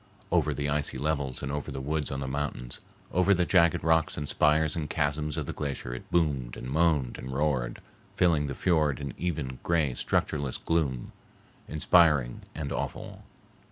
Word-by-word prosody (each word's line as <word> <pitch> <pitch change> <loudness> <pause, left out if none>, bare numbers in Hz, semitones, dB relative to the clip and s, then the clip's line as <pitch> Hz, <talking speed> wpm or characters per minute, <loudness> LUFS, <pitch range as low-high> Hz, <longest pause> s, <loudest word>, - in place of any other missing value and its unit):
Over - - +2
the 70 0 -1
icy 70 -2 -1
levels 70 -3 -1
and 70 - -2
over 75 0 -3
the 65 - -4
woods, 75 +2 -1
on 70 0 -3
the 65 - -3
mountains, 65 -3 -4 0.3
over 90 +3 +4
the 90 0 +2
jagged 85 -2 +4
rocks 80 -1 +2
and 75 -1 -3
spires 75 +1 +3
and 75 -3 -3
chasms 75 0 -1
of - - -2
the - - -4
glacier 70 -4 -4
it 60 - -8
boomed 70 -8 0
and 60 - -6
moaned 75 -5 +2
and 65 - -6
roared, 65 -4 -1 0.3
filling 80 -5 +3
the 70 - -4
fiord 75 -6 +2
in 70 -3 -5
even, 75 -7 -3
gray, 80 -6 +1
structureless 70 +1 -1
gloom, 70 -7 -1 0.6
inspiring 75 -5 +3
and 75 -3 -4
awful. - - -4
75 Hz, 170 wpm, -28 LUFS, 65-80 Hz, 0.6 s, over